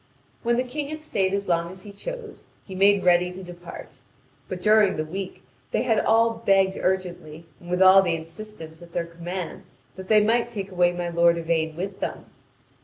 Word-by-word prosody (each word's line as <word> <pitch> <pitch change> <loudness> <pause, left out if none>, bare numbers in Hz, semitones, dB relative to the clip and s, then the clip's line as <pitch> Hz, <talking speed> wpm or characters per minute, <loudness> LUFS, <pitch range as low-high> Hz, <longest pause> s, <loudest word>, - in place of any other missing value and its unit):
When 235 0 +1
the 250 - +2
King 280 +3 -4
had 310 0 -6
stayed 190 -10 0
as 200 0 -2
long 170 -1 +1
as 185 +1 -10
he 205 - -9
chose, 485 - -8 0.2
he 190 - -9
made 200 +1 +4
ready 180 0 +4
to 190 +1 -9
depart. 175 -1 -11 0.5
But 185 - -4
during 210 0 +4
the 155 - -2
week 185 +1 -6 0.3
they - - 0
had 225 -4 +2
all 225 0 +2
begged 195 -2 +3
urgently, 175 -4 -2
and 175 - -13
with 180 +1 +3
all 190 +1 +8
the 175 -3 0
insistence 165 0 -9
at 170 -1 -14
their 170 - -1
command, 175 +1 -7 0.3
that 190 0 -8
they 215 +1 +6
might 235 +2 +2
take 200 -4 -6
away 175 -1 +3
my 175 0 -3
lord 170 0 +3
Yvain 160 -1 -1
with 190 +3 -5
them. - - -4
185 Hz, 195 wpm, -24 LUFS, 170-210 Hz, 0.5 s, all